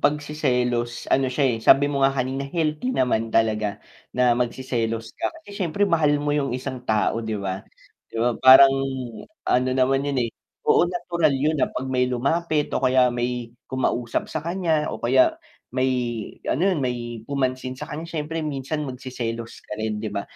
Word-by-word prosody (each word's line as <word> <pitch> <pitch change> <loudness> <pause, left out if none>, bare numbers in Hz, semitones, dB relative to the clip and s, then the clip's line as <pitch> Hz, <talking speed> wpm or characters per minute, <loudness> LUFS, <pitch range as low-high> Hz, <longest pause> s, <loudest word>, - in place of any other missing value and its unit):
pagseselos 125 -5 0
ano 135 -1 +3
siya, 140 +3 0
eh, 120 -4 +2
sabi 145 +5 +5
mo 140 - -1
nga 135 - +6
kanina 135 +2 -2
healthy 155 - -1
naman 125 - +1
talaga, 110 -2 0 0.3
na 125 -1 +4
magseselos 120 -2 -2
ka - - -2 0.2
kasi 205 0 -10
siyempre 185 +3 +1
mahal 160 -6 +3
mo 145 0 -1
yung 140 -4 0
isang 130 0 -5
tao 110 +1 +1
'di 110 -1 -3
ba, 95 -1 -3 0.5
'di - - -9
ba 120 +2 +2
parang 135 +1 +9 0.7
ano 125 +1 +2
naman 135 +2 +2
yun, 135 -4 +1
eh 115 - -3 0.3
oo, 175 - +4
natural 170 -4 0
yun 150 +2 0
na - - +3
'pag 130 - -4
may 130 -1 +1
lumapit 150 +5 0
o - - 0
kaya 130 -1 +4
may 120 -1 -3 0.2
kumausap 125 -3 -1
sa 155 - -4
kanya 165 -2 0
o - - -4
kaya, 130 +2 +3 0.4
may 130 0 +2 0.6
ano 180 +8 +2
yun 180 - 0
may 120 -3 -3
pumansin 130 -2 -2
sa 130 - -8
kanya 160 +2 -5
siyempre 160 -1 -4
minsan 150 +1 -3
magseselos 120 -3 -5
ka - - -5
rin, 110 -1 -2
'di 110 - -4
ba? 100 -1 -3
130 Hz, 175 wpm, -24 LUFS, 120-150 Hz, 0.7 s, parang